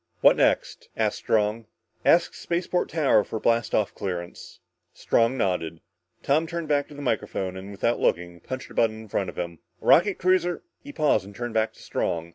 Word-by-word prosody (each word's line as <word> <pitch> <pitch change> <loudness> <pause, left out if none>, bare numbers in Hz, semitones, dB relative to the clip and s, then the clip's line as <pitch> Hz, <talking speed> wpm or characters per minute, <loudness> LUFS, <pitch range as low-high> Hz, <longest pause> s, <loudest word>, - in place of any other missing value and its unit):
What - - +7
next?" - - 0
asked - - 0
Strong. 110 +1 0 0.4
"Ask 170 0 +4
spaceport 175 +1 -1
tower 140 -9 +3
for 110 - -5
blast 115 +1 +1
off 105 - +1
clearance 90 -2 -6 0.2
" - - -51
Strong 115 +3 +2
nodded. 85 -6 -1 0.4
Tom 155 +4 +2
turned 170 -1 -4
back 145 -1 +1
to 150 - -13
the 145 - -7
microphone, 95 -6 -2
and 95 +1 -8
without 115 +4 -1
looking, 85 0 0
punched 130 +9 -7
a - - -10
button 110 -1 +1
in 110 - -15
front 95 -1 -1
of - - -10
him. 85 -2 -4 0.2
"Rocket 195 +3 +4
cruiser 180 -1 +1
" - - -55
He 285 - -8
paused 145 - +2
and 100 0 -12
turned 120 0 -4
back 110 0 +1
to - - -16
Strong. 85 0 -2
115 Hz, 195 wpm, -25 LUFS, 95-150 Hz, 0.4 s, What